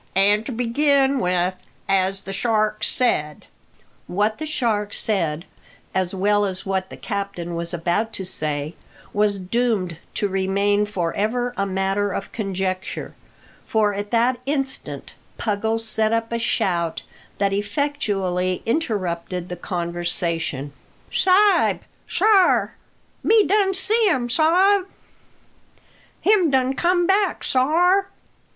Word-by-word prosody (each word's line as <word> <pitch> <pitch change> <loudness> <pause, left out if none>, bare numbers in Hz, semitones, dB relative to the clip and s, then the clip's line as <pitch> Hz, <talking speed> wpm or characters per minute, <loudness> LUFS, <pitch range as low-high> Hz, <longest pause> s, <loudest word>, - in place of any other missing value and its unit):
An' 205 +2 +4
to - - -4
begin 270 +3 +2
with, 180 -2 +1 0.3
as 195 0 +1
the 195 - -6
shark 215 0 0
said 150 - 0 0.3
" - - -30 0.2
What 210 +4 0
the 310 - -4
shark 220 -8 -1
said, 170 -6 +1 0.5
as 185 0 -1
well 205 +2 +2
as 185 -2 -3
what 190 -1 -2
the - - -10
captain 200 -5 -4
was 170 0 -2
about 175 +6 -1
to 190 - -3
say, 150 -2 -1 0.4
was 205 -1 +2
doomed 190 -3 -1 0.2
to 205 - 0
remain 200 +2 +1
for 175 -5 -2
ever 245 +4 -1
a 200 -2 -1
matter 195 +1 0
of 195 - -5
conjecture, 190 -3 -3 0.5
for 215 -2 +2
at 205 +1 -4
that 240 +2 +2
instant 270 -2 -3 0.2
Puggles 220 +1 -1
set 220 0 +1
up 230 0 -1
a 235 - -1
shout 170 -7 -1 0.3
that 200 -1 +1
effectually 200 -6 -1
interrupted 185 - -2
the 180 - -4
conversation. 170 -5 -3 0.4
"Sa'b! 395 +2 +4 0.3
sar! 390 -1 +3 0.5
me 440 -2 +4
done 390 -1 +2
see 430 +3 +2
um, 245 -6 -1
sa'b. 370 +7 +3 1.3
Him 400 -6 +4
done 265 -1 +2
come 350 +5 +2
back, 390 0 +1
sar." 355 +9 +2
205 Hz, 125 wpm, -22 LUFS, 185-265 Hz, 1.3 s, An